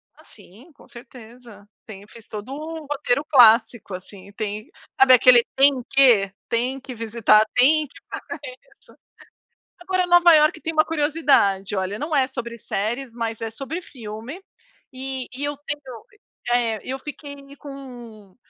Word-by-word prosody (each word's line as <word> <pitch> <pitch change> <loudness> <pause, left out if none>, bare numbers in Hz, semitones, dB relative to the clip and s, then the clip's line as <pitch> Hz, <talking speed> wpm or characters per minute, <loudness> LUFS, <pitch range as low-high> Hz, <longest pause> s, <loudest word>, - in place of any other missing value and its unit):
Ah - - -20
sim, 245 - -18
com - - -20
certeza. 235 -3 -15 0.2
Tem, 205 -1 -11
fez 230 -1 -16
todo 215 +3 -8
o 315 +1 -7
roteiro 285 -1 0
clássico 235 -6 +4
assim, 190 +1 -10
tem 210 0 -5 0.3
sabe 265 -1 +7
aquele 250 -1 +7
"tem 270 -1 +3
que": 240 -8 +4 0.2
tem 250 +3 -1
que 255 -2 -9
visitar, 220 -1 +3
tem 300 +4 +4
que - - -26 0.7
fazer - - -27
isso. - - -21 0.9
Agora, 370 0 0
Nova 350 -1 +6
Iorque 305 +1 +3
tem 325 - -4
uma 310 0 +3
curiosidade. 290 -12 +1
Olha, 190 +1 -3
não 300 +2 -3
é 265 -2 +2
sobre 240 -3 -7
séries, 230 +4 -4
mas 230 -1 -4
é 225 - -3
sobre 280 +9 -6
filme. 235 - -9 0.5
E 260 0 -5
e 265 +3 -6
eu 290 0 -3
tenho 275 -5 -8 0.5
eh, 230 -3 +1
eu 265 +1 -5
fiquei 285 0 -9 0.2
com 240 -8 -12
250 Hz, 150 wpm, -22 LUFS, 220-285 Hz, 0.9 s, sabe